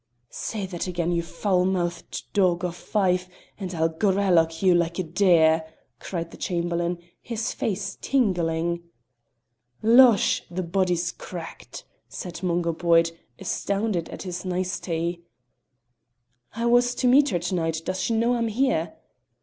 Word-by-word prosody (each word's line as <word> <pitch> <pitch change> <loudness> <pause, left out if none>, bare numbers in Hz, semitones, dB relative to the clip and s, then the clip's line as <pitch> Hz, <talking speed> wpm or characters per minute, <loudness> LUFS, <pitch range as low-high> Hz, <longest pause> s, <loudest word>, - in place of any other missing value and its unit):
"Say 210 -3 -4
that 180 -1 -4
again, 175 -1 -1
you 170 -1 +1
foul 180 +2 0
mouthed 175 -2 -2
dog 180 -3 +2
o' 180 - -1
Fife, 185 0 0 0.3
and 190 -3 -4
I'll 160 0 +2
gralloch 175 -2 +2
you 185 -2 +6
like 170 -1 +1
a 185 - 0
deer!" 165 -2 +4 0.4
cried 170 -2 -5
the - - -11
Chamberlain, 175 -1 -1 0.2
his 230 -1 -3
face 195 -2 -3
tingling. 170 -8 0 1.0
"Losh! 235 -1 +6
the 180 +2 -3
body's 180 0 0
cracked," - - -9 0.2
said 175 0 -7
Mungo 170 -2 0
Boyd, 165 0 +3 0.3
astounded 200 -1 -2
at - - -8
this 180 -1 -5
nicety. 175 -2 -2 1.3
"I 230 +1 -2
was 245 +1 +3
to 250 - +1
meet 280 +3 +5
her 180 - 0
to 175 +2 -3
night; 165 -2 -1
does 185 0 -2
she 230 - 0
know 235 +2 +2
I'm 235 -1 0
here?" 215 -9 0
180 Hz, 140 wpm, -25 LUFS, 170-200 Hz, 1.3 s, you